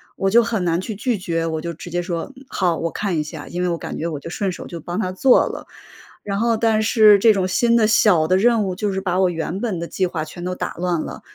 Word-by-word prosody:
我 195 - 0
就 235 +4 +6
很 225 -4 -1
难 170 -1 +1
去 210 +3 -5
拒 235 +2 -1
绝， 165 -3 -2
我 160 -1 -2
就 170 +1 -4
直 175 +2 -10
接 175 +1 -1
说： 170 -2 -3
“嗯 270 - -14
好， 175 -8 0
我 165 - -2
看 195 -5 -2
一 - - 0
下。” 150 -1 -9
因 175 - -3
为 180 - +1
我 170 - -1
感 - - -6
觉 165 - -3
我 155 -4 -4
就 - - -7
顺 195 +3 -2
手 - - -8
就 170 - -7
帮 175 +5 -5
他 185 - -2
做 245 +7 +4
了。 - - -7 0.6
然 200 -1 -2
后 230 0 +2
但 220 -1 +2
是 215 -2 +6
这 220 +2 +5
种 190 -2 0
新 235 +5 +2
的、 225 -2 +4
小 205 -7 +4
的 185 +3 +3
任 230 +1 +3
务 185 -2 -2
就 205 +2 -2
是 190 - -3
把 185 -1 0
我 185 - +4
原 170 +3 -3
本 215 -8 -2
的 170 - -4
计 185 +2 -1
划 165 -3 -3
全 165 +3 -10
都 180 +1 -3
打 - - -4
乱 175 -1 0
了， - - -7
185 Hz, 305 characters per minute, -21 LUFS, 170-215 Hz, 0.6 s, 就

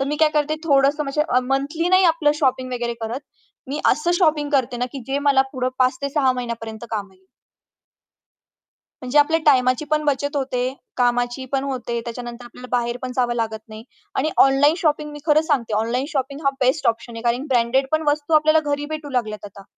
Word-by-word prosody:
तर 270 - +1
मी 295 - -1
काय 310 - +6
करते 300 +1 +1
थोडंसं 285 0 +3
म्हणजे 280 +2 0
अ, 250 - +3
मंथली 300 +6 -1
नाही 370 0 +5
आपलं 295 -3 +2
शॉपिंग 255 -2 0
वगैरे 240 -1 -2
करत. 235 +5 -3 0.5
मी 295 +2 -3
असं 300 +6 -1
शॉपिंग 300 -4 +2
करते 260 -4 +1
ना 245 - -1
की 275 - -6
जे 275 +1 -1
मला 265 -1 +5
पुढे 255 -1 -1
5 255 0 +2
ते 280 - 0
6 270 -3 +2
महिन्यापर्यंत 235 -2 -6
काम 200 -3 -4
येईल. 190 0 -27 1.8
म्हणजे 255 +4 +1
आपल्या 320 +3 +4
टाईमाची 255 0 +4
पण 305 0 +1
बचत 285 +1 -1
होते, 255 -1 -1 0.2
कामाची 245 +1 0
पण 270 0 0
होते, 245 -3 -3
त्याच्यानंतर 240 +1 -7
आपल्याला 250 +1 -11
बाहेर 240 0 -1
पण 255 0 -4
जावं 240 -1 +1
लागत 220 -2 -2
नाही. 215 +1 -10 0.3
आणि 310 +4 +1 0.2
ऑनलाईन 285 +3 +4
शॉपिंग 300 -2 0
मी 295 - -8
खरं 305 0 +5
सांगते 260 -9 -1
ऑनलाईन 230 +5 0
शॉपिंग 280 -1 -3
हा 275 - +4
बेस्ट 260 +4 +1
ऑप्शन 230 +1 -2
आहे, 230 - -7
कारण 245 +4 0
ब्रँडेड 255 +2 +2
पण 315 0 +2
वस्तू 300 +2 0
आपल्याला 310 +1 +5
घरी 290 0 -1
भेटू 305 -2 -5
लागल्यात 215 -5 -2
आता. 200 0 -13
265 Hz, 195 wpm, -21 LUFS, 240-295 Hz, 1.8 s, काय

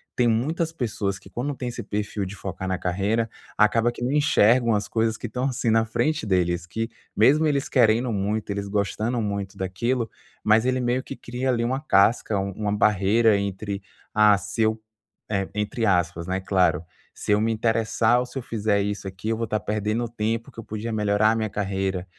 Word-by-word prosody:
tem 125 - +3
muitas 155 +9 0
pessoas 105 -7 -2
que - - -16
quando 140 +4 -3
tem 125 -1 -4
esse 120 - -6
perfil 105 -1 -3
de 95 +2 -7
focar 95 -1 -5
na 95 - 0
carreira, 100 +6 0 0.3
acaba 115 +2 +4
que 120 - -6
não 125 - 0
enxergam 125 -6 +4
as 105 - -1
coisas 110 -1 +1
que - - -5
estão, 125 +4 -3
assim, 130 -2 0
na 110 0 +3
frente 150 +5 0
deles, 90 -3 +1
que 115 +5 -3 0.3
mesmo 145 +9 +5
eles 140 -2 0
querendo 120 -1 +3
muito, 105 +2 -2
eles 100 0 -3
gostando 105 +4 -1
muito 100 -2 -3
daquilo, 115 +6 -1 0.3
mas 110 +3 +4
ele 130 0 +1
meio 125 +1 +1
que 135 - -7
cria 125 +2 -3
ali 120 -2 +1
uma 130 +3 0
casca, 105 -4 +3
u 100 0 -2
uma 105 +1 -2
barreira 105 +2 +4
entre 100 0 -3 0.3
a 105 -1 +6
seu, 110 +3 -1 0.7
entre 105 +2 -1
aspas, 90 -3 +1
né, 95 +1 -1
claro, 90 -3 +2 0.3
se - - -4
eu 105 - +3
me 115 +1 +1
interessar 115 +1 +2
ou 125 - -1
se 125 +2 -9
eu - - -2
fizer 105 -2 0
isso 100 -1 -3
aqui 95 +3 -5
eu 110 - 0
vou 115 - -1
estar 110 -1 -1
perdendo 105 +3 -1
tempo 115 0 -2
que - - -12
eu - - -6
podia 110 +2 -4
melhorar 105 0 +3
a - - +1
minha 110 -1 -1
carreira. 95 -2 -2
110 Hz, 195 wpm, -24 LUFS, 100-120 Hz, 0.7 s, a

